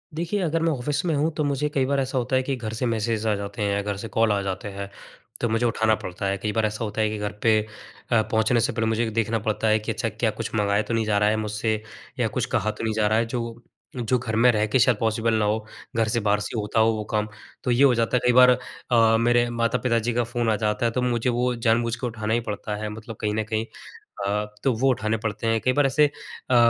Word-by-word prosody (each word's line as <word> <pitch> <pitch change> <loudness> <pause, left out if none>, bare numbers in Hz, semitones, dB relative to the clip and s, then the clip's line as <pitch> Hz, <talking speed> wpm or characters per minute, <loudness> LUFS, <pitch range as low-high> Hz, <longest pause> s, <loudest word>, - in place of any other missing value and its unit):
देखिए, 175 +5 -1
अगर 165 -2 0
मैं 165 0 +2
ऑफिस 145 +1 -2
में 165 - +1
हूँ 150 +3 +1
तो 155 - +1
मुझे 145 0 0
कई 135 -3 0
बार 140 +1 +1
ऐसा 135 0 -2
होता 125 +1 0
है 130 - +2
कि 135 +1 -2
घर 110 -3 -5
से 110 +3 -2
मैसेज 115 -1 -1
आ 110 - +3
जाते 100 +1 -6
हैं, 100 0 0
घर 100 -1 -3
से 115 - -6
कॉल 115 -1 +2
आ 100 -1 +1
जाते 95 +1 -4
हैं, 100 0 -6 0.5
तो 120 - +1
मुझे 115 +2 +1
उठाना 110 -1 +2
पड़ता 90 -1 -6
है। 100 0 0
कई 105 +2 -2
बार 110 +1 +1
ऐसा 110 +1 -3
होता 110 0 -2
है 110 - +2
कि 110 - -4
घर 105 0 -3
पे 110 -2 +5 0.5
अ, 115 -2 +5
पहुँचने 110 +2 +1
से - - 0
पहले 115 -2 -1
मुझे 110 +1 0
देखना 115 +1 0
पड़ता 110 +1 -1
है 110 0 +4
कि 110 +2 -3
अच्छा 115 +1 -2
क्या 110 +1 -1
कुछ - - -4
मँगाया 100 -1 +2
तो 115 - -4
नहीं 115 -1 +1
जा 105 -1 +1
रहा 105 0 +3
है 110 - +2
मुझसे 110 0 -1 0.4
या - - +2
कुछ - - -2
कहा 110 - +1
तो - - -8
नहीं 110 -1 0
जा 105 -1 +2
रहा 110 +1 +2
है? 115 - +2
जो 115 0 -5 0.3
जो 125 0 0
घर 115 -2 -3
में 120 +3 +5
रह 105 -2 +1
के 120 +5 +2
शायद 120 -1 +4
पॉसिबल 115 0 +1
ना 110 -1 +2
हो, 105 +1 0 0.3
घर 115 -1 +2
से 115 +2 +1
बाहर 105 -1 +1
से 110 - -4
होता 105 +1 -1
हो 110 +1 +5
वो 110 -1 -3
काम। 105 0 +1 0.4
तो 125 - 0
ये 120 +3 +4
हो 135 -3 +6
जाता 115 +2 +1
है - - +2
कई 125 - +4
बार 125 +1 +8 0.4
अ, 115 -1 +5
मेरे 120 +1 +3
माता-पिता 115 0 +1
जी - - 0
का 120 +1 +1
फ़ोन 120 0 -1
आ - - +2
जाता 105 +2 -1
है 115 - +2
तो 125 - -1
मुझे 125 0 0
वो 125 +1 +1
जानबूझ 115 0 +1
के 125 - -3
उठाना 110 -2 -3
ही 120 - +3
पड़ता 105 0 -4
है, 105 +1 -4
मतलब 110 +1 -8
कहीं 105 -1 0
न 110 - 0
कहीं 110 +1 -2 0.6
अ, 105 +1 0 0.2
तो 135 - +3
वो 135 +4 +3
उठाने 110 -2 -1
पड़ते 110 0 -3
हैं, 115 0 +2
कई 130 +3 +2
बार 145 +1 +3
ऐसे 145 +3 +4
अ, 145 -3 -4
115 Hz, 275 wpm, -24 LUFS, 110-120 Hz, 0.6 s, बार